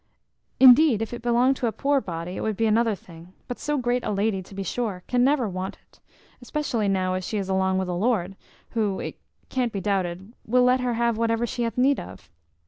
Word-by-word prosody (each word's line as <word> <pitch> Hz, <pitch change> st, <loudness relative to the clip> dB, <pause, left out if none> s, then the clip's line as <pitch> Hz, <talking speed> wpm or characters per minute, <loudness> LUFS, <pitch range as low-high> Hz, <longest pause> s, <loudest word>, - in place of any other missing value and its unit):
Indeed, 255 Hz, -3 st, +7 dB
if 225 Hz, -, -6 dB
it 240 Hz, -, -6 dB
belonged 245 Hz, +3 st, +2 dB
to 245 Hz, -, -1 dB
a -, -, 0 dB
poor 280 Hz, +3 st, +1 dB
body, 175 Hz, -2 st, -5 dB
it -, -, -4 dB
would 215 Hz, -2 st, -2 dB
be 225 Hz, -, +1 dB
another 225 Hz, 0 st, +2 dB
thing; 170 Hz, 0 st, -15 dB
but 245 Hz, -, -6 dB
so 295 Hz, 0 st, -1 dB
great 245 Hz, -1 st, 0 dB
a -, -, -2 dB
lady, 205 Hz, -1 st, 0 dB
to 190 Hz, +1 st, -13 dB
be 195 Hz, -, -3 dB
sure, 195 Hz, -2 st, -3 dB
can 245 Hz, -1 st, +1 dB
never 270 Hz, -3 st, +2 dB
want 185 Hz, 0 st, -5 dB
it, -, -, -27 dB, 0.4 s
especially 245 Hz, -5 st, -2 dB
now 185 Hz, -1 st, +1 dB
as 185 Hz, 0 st, -2 dB
she 215 Hz, -, -3 dB
is 195 Hz, -2 st, -3 dB
along 190 Hz, 0 st, +1 dB
with 190 Hz, -1 st, -1 dB
a 180 Hz, -, -2 dB
lord, 195 Hz, -1 st, 0 dB, 0.4 s
who, 210 Hz, -4 st, -1 dB
it -, -, -6 dB, 0.3 s
can't 250 Hz, -3 st, -1 dB
be 200 Hz, -, -3 dB
doubted, 190 Hz, +1 st, -2 dB
will 250 Hz, +3 st, +3 dB
let 250 Hz, +1 st, +4 dB
her 250 Hz, -2 st, -1 dB
have 235 Hz, -1 st, 0 dB
whatever 230 Hz, 0 st, +1 dB
she 245 Hz, +1 st, -4 dB
hath 230 Hz, 0 st, -2 dB
need 270 Hz, +3 st, +3 dB
of. 75 Hz, -, -11 dB
225 Hz, 225 wpm, -25 LUFS, 190-245 Hz, 0.4 s, Indeed